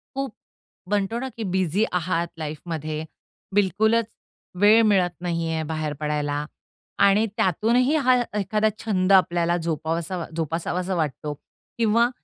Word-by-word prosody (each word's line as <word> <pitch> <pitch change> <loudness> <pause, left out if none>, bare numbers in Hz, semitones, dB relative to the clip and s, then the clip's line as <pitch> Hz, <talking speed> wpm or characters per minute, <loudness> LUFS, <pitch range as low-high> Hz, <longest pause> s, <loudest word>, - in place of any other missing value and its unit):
खूप 270 -4 -3 0.6
म्हणतो 205 +3 0
ना 265 - -4
की 225 - -3
बिझी 190 +2 +1
आहात 170 -1 0
लाईफमध्ये, 155 0 -4 0.5
बिलकुलच 220 +3 +3 0.6
वेळ 215 +2 +7
मिळत 190 -5 +3
नाही 170 -2 -1
आहे 160 0 -1
बाहेर 155 -1 -2
पडायला 150 -1 -1 0.6
आणि 200 +2 +4
त्यातूनही 235 - +2
हा 255 -4 +4 0.2
एखादा 215 +2 +1
छंद 195 -3 0
आपल्याला 175 -2 +3
जोपावासा 165 +2 -2
जोपासावासा 170 +3 -2
वाटतो 150 -2 -2 0.4
किंवा 230 +1 +3
180 Hz, 120 wpm, -24 LUFS, 160-215 Hz, 0.6 s, वेळ